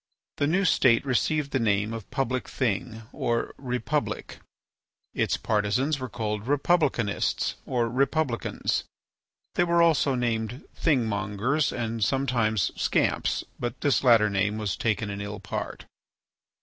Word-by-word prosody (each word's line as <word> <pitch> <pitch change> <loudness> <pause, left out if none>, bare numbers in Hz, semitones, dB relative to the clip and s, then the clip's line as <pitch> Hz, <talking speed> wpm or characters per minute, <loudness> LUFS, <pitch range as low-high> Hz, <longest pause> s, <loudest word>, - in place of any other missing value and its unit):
The 145 - +1
new 185 +6 +2
state 130 -6 +4
received 140 +2 0
the 135 - +1
name 105 -1 +1
of 115 -3 -7
Public 130 -1 -2
Thing 115 -1 -2
or 120 -5 -1
Republic. 125 -3 -2 0.7
Its - - +1
partisans 125 +8 0
were 130 -1 -5
called 105 -1 -3
republicanists 140 -7 +1
or 120 -3 +1
republicans. 135 +1 0 0.7
They - - +3
were 170 -1 +4
also 150 -5 +3
named 120 +1 -2
Thingmongers 115 - +1
and 115 -2 -2
sometimes 115 -6 +1
Scamps, - - +1 0.2
but 120 0 -4
this 145 -2 +2
latter 115 -4 +6
name 100 +2 0
was 105 -3 -2
taken 105 -2 -1
in 100 0 -5
ill 100 0 -5
part. 105 - -5
120 Hz, 125 wpm, -26 LUFS, 105-135 Hz, 0.7 s, latter